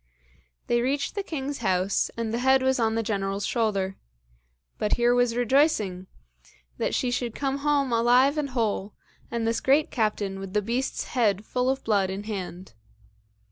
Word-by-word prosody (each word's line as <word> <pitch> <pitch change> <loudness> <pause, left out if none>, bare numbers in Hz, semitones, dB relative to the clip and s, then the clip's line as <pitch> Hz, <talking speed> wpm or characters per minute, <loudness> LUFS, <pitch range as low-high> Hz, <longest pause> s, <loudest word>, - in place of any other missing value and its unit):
They 240 0 +1
reached 275 +3 -1
the 405 - -2
king's 285 -6 -4
house, 190 -2 +1
and 230 -1 -2
the 235 - 0
head 265 +1 +4
was 265 0 +2
on 225 -1 +1
the 225 - 0
General's 200 -2 -2
shoulder. 200 -5 -1 0.8
But 210 - 0
here 240 0 +3
was 245 -1 +2
rejoicing, 240 - +2 0.7
that - - 0
she 250 - 0
should 245 -2 -2
come 275 0 -1
home 280 -3 +1
alive 245 +5 +4
and 300 -2 -1
whole, 215 -5 -2 0.3
and 235 -1 -2
this 230 0 0
great 285 +3 +3
captain 210 -4 -1
with 195 -1 -7
the 210 - +2
beast's 240 +5 -2
head 215 -5 +1
full 250 +2 0
of 265 0 -1
blood 200 -4 +1
in 195 +2 -4
hand. 190 - -6
235 Hz, 170 wpm, -26 LUFS, 205-265 Hz, 0.8 s, head